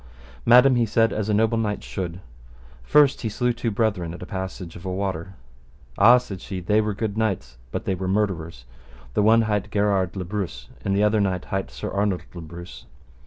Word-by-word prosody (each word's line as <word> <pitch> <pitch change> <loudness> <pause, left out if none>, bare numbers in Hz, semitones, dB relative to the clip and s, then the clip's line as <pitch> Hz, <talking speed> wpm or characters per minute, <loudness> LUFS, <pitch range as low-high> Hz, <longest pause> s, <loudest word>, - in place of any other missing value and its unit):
Madam, 125 +2 +7
he 120 - +3
said, 115 +1 +2
as 105 0 -2
a - - +2
noble 110 +1 +2
knight 105 -2 -2
should. 90 -2 -5 0.6
First, 140 - +4
he 115 - -2
slew 125 +3 0
two 120 0 -2
brethren 100 -6 -1
at - - -11
a - - -6
passage 95 -3 -6
of 85 - -10
a 95 - -3
water. 95 -1 -3 0.6
Ah! 120 +5 +7
said 100 -7 -6
she, 95 -2 -5
they 105 +5 +2
were 105 -1 -2
good 110 0 -2
knights, 80 - -2
but - - -4
they 95 - 0
were 95 0 -3
murderers, 85 - -1 0.5
the - - +2
one 115 +2 +5
hight 105 -1 -1
Gherard 100 -3 +1
le 95 -2 -4
Breuse, 85 -9 -5
and 100 - 0
the 100 - +3
other 105 0 +3
knight 95 -2 -1
hight 95 0 -3
Sir - - -6
Arnold 100 -2 0
le 85 - -7
Breuse. 85 +2 -10
100 Hz, 205 wpm, -24 LUFS, 90-110 Hz, 0.6 s, Madam